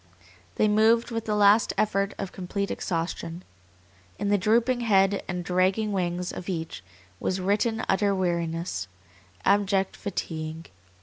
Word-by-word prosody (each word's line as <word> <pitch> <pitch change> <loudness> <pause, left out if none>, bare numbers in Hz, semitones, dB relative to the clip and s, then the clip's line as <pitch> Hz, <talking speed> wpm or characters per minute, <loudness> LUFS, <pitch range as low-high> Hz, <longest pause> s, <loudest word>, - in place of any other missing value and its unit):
They 215 - +3
moved 220 +3 +3
with 230 -1 -3
the 210 - 0
last 210 +2 +5
effort 200 -2 +1
of 195 - -4
complete 200 +2 -3
exhaustion. 165 0 -3 0.7
In 205 - -1
the 205 - +4
drooping 235 +5 +2
head 200 -4 +3
and 180 -1 -4
dragging 190 +4 +1
wings 180 -2 -1
of 180 - -7
each 160 - -4 0.4
was 185 - -1
written 215 +4 0
utter 200 0 +2
weariness, 170 - -2 0.6
abject 195 -1 +2
fatigue. 160 -5 -5
195 Hz, 130 wpm, -26 LUFS, 175-210 Hz, 0.7 s, last